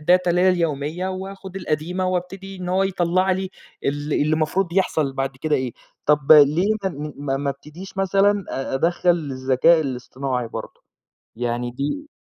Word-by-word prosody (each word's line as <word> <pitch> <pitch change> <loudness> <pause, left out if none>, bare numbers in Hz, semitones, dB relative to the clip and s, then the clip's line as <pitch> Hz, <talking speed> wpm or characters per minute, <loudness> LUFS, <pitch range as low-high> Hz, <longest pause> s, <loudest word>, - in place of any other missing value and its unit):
الdata 180 +3 +3
اللي 175 +1 +3
هي 185 - +5
اليومية 165 0 0
واخُد 190 0 -7
القديمة 180 +2 -2
وأبتدي 190 +2 -4
إن 180 -1 -6
هو 185 +2 +2
يطلع 185 0 +1
لي 190 0 -2 0.3
ال - - +2 0.2
اللي - - +2
المفروض 155 +4 +1
يحصل 155 -7 +1
بعد 135 -1 -3
كده 155 +3 0
إيه. 130 -2 -2 0.3
طب 150 0 +5
ليه 150 +4 +6 0.5
ما 140 -1 -1
ما 140 0 -1
ابتديش 155 +8 -10
مثلًا 195 +1 +3 0.3
أدخّل 175 +5 +2
الذكاء 140 0 +3
الاصطناعي 130 -2 -3
برضه؟ - - -8 0.5
يعني 120 +1 -2
دي 145 - -3
170 Hz, 145 wpm, -22 LUFS, 140-185 Hz, 0.5 s, ليه